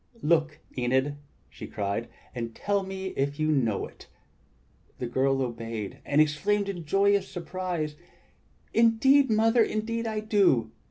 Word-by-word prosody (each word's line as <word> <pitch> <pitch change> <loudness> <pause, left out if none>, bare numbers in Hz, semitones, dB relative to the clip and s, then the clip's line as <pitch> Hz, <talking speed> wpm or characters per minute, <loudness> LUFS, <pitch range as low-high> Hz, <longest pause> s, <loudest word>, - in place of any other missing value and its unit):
"Look, 155 -1 +1
Enid," 130 +3 0 0.3
she - - -10
cried, 100 +3 -3 0.2
"and 115 -2 -5
tell 200 -1 0
me 190 0 -5
if 140 -2 -2
you 155 0 +2
know 115 -9 +1
it." - - -15 0.9
The - - -3
girl 135 +2 +1
obeyed, 115 -4 -5
and 145 +1 +1
exclaimed 195 +7 +2
in 175 -4 -5
joyous 200 +4 +3
surprise: 175 -3 -4 0.8
"Indeed, 235 +5 +5
Mother, 225 +2 +4
indeed 230 +2 -2
I 220 -1 -2
do! 190 - +3
160 Hz, 130 wpm, -27 LUFS, 130-205 Hz, 0.9 s, Indeed